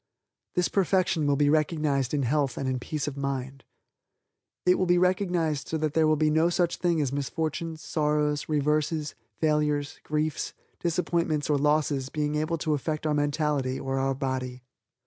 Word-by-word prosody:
This 180 Hz, -1 st, +2 dB
perfection 185 Hz, -5 st, +1 dB
will 145 Hz, -, +3 dB
be 145 Hz, +1 st, +3 dB
recognized 150 Hz, -3 st, +1 dB
in 145 Hz, -2 st, 0 dB
health 135 Hz, 0 st, 0 dB
and 135 Hz, -, -2 dB
in 130 Hz, -1 st, -1 dB
peace 150 Hz, +4 st, -3 dB
of 145 Hz, -, -3 dB
mind. 135 Hz, -1 st, -3 dB, 1.0 s
It 180 Hz, 0 st, +4 dB
will 185 Hz, -, +1 dB
be 175 Hz, 0 st, +4 dB
recognized 175 Hz, -5 st, +1 dB
so 160 Hz, -, -1 dB
that 155 Hz, -1 st, -1 dB
there 160 Hz, -1 st, +4 dB
will 155 Hz, -, +4 dB
be 155 Hz, 0 st, +2 dB
no 160 Hz, +2 st, +3 dB
such 175 Hz, 0 st, +1 dB
thing 170 Hz, -2 st, +1 dB
as 140 Hz, -3 st, 0 dB
misfortunes, 155 Hz, +3 st, -3 dB
sorrows, 150 Hz, -1 st, 0 dB
reverses, 150 Hz, +1 st, 0 dB, 0.2 s
failures, 150 Hz, -2 st, 0 dB
griefs, 155 Hz, 0 st, -2 dB, 0.2 s
disappointments 170 Hz, -3 st, 0 dB
or 145 Hz, -, +3 dB
losses 145 Hz, -2 st, +1 dB
being 150 Hz, 0 st, -1 dB
able 155 Hz, +2 st, 0 dB
to 155 Hz, 0 st, 0 dB
affect 155 Hz, +2 st, -2 dB
our 155 Hz, -, +2 dB
mentality 145 Hz, -3 st, 0 dB
or 135 Hz, 0 st, -2 dB
our 135 Hz, 0 st, 0 dB
body. 130 Hz, -2 st, -3 dB
150 Hz, 165 wpm, -27 LUFS, 140-160 Hz, 1.0 s, It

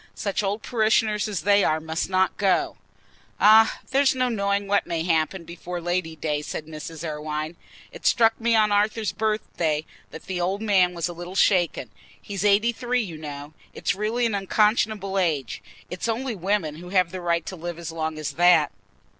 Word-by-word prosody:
Such 200 Hz, 0 st, -2 dB
old 205 Hz, +2 st, -2 dB
parishioners 220 Hz, -2 st, +1 dB
as 200 Hz, -7 st, -3 dB
they 200 Hz, +2 st, +4 dB
are 155 Hz, 0 st, +2 dB
must 160 Hz, +2 st, -3 dB
not 190 Hz, 0 st, +2 dB
go." 190 Hz, -3 st, +1 dB, 0.6 s
"Ah, 220 Hz, +1 st, +6 dB
there's 270 Hz, 0 st, +3 dB
no 255 Hz, -1 st, +1 dB
knowing 200 Hz, -2 st, 0 dB
what 200 Hz, 0 st, +1 dB
may 165 Hz, -1 st, -2 dB
happen 165 Hz, +1 st, 0 dB
before 175 Hz, +1 st, -7 dB
Lady 175 Hz, -1 st, -2 dB
day," 150 Hz, -1 st, -2 dB
said 150 Hz, +1 st, -6 dB
Mrs. 160 Hz, +1 st, -7 dB
Irwine. 155 Hz, +1 st, -4 dB, 0.4 s
"It -, -, -4 dB
struck 230 Hz, -2 st, +3 dB
me 230 Hz, 0 st, +3 dB
on 215 Hz, -1 st, +3 dB
Arthur's 210 Hz, +1 st, +1 dB
birthday 185 Hz, -7 st, -1 dB, 0.2 s
that 160 Hz, -, -11 dB
the 180 Hz, -1 st, -3 dB
old 190 Hz, +3 st, -1 dB
man 190 Hz, -5 st, +2 dB
was 170 Hz, 0 st, -1 dB
a 175 Hz, -, -6 dB
little 175 Hz, +2 st, -8 dB
shaken: 175 Hz, -, +2 dB, 0.3 s
he's 200 Hz, -2 st, -5 dB
eighty 210 Hz, +3 st, +4 dB
three, 245 Hz, +1 st, -1 dB
you 165 Hz, -6 st, -8 dB
know. 145 Hz, 0 st, -8 dB, 0.2 s
It's -, -, 0 dB
really 220 Hz, +4 st, -1 dB
an 225 Hz, -, 0 dB
unconscionable 205 Hz, 0 st, +1 dB
age. 150 Hz, -9 st, -1 dB, 0.3 s
It's 180 Hz, +5 st, -3 dB
only 240 Hz, +2 st, -2 dB
women 180 Hz, -5 st, -1 dB
who 180 Hz, +2 st, -10 dB
have 185 Hz, -2 st, +2 dB
a 185 Hz, -, -5 dB
right 170 Hz, -1 st, 0 dB
to 190 Hz, -, -6 dB
live 170 Hz, 0 st, -6 dB
as 170 Hz, -1 st, -6 dB
long 160 Hz, -1 st, -3 dB
as 155 Hz, -2 st, -3 dB
that." 175 Hz, -4 st, +4 dB
185 Hz, 185 wpm, -24 LUFS, 165-210 Hz, 0.6 s, Ah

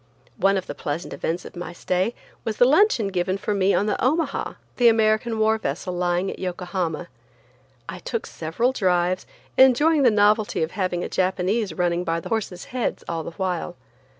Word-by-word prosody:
One 195 Hz, +1 st, +3 dB
of 185 Hz, -, -3 dB
the -, -, -5 dB
pleasant 155 Hz, +2 st, -4 dB
events 170 Hz, +2 st, -3 dB
of -, -, -10 dB
my 175 Hz, -1 st, -6 dB
stay 185 Hz, +6 st, -1 dB, 0.3 s
was 220 Hz, -2 st, -3 dB
the 245 Hz, -, +6 dB
luncheon 280 Hz, -, +4 dB
given 185 Hz, 0 st, -1 dB
for 210 Hz, -, -2 dB
me 195 Hz, -1 st, +2 dB
on 200 Hz, -, +2 dB
the 210 Hz, -, -1 dB
Omaha, 290 Hz, +2 st, 0 dB, 0.2 s
the 245 Hz, -, +5 dB
American 220 Hz, 0 st, +3 dB
war 220 Hz, 0 st, +2 dB
vessel 180 Hz, +1 st, -3 dB
lying 175 Hz, +1 st, 0 dB
at -, -, -9 dB
Yokohama. 180 Hz, -2 st, -3 dB, 0.8 s
I 180 Hz, +2 st, -6 dB
took 230 Hz, +4 st, -4 dB
several 165 Hz, +11 st, -1 dB
drives, 185 Hz, -5 st, +1 dB, 0.3 s
enjoying 285 Hz, +4 st, +5 dB
the 255 Hz, -, +6 dB
novelty 210 Hz, -3 st, +3 dB
of 160 Hz, -, -3 dB
having 185 Hz, -3 st, -1 dB
a -, -, -2 dB
Japanese 190 Hz, +3 st, 0 dB
running 175 Hz, -1 st, 0 dB
by 165 Hz, -1 st, -1 dB
the -, -, -8 dB
horses' 205 Hz, -5 st, -3 dB
heads 250 Hz, -2 st, -2 dB
all 165 Hz, -1 st, -2 dB
the 165 Hz, +2 st, -8 dB
while. 180 Hz, -2 st, -2 dB
190 Hz, 180 wpm, -23 LUFS, 175-220 Hz, 0.8 s, the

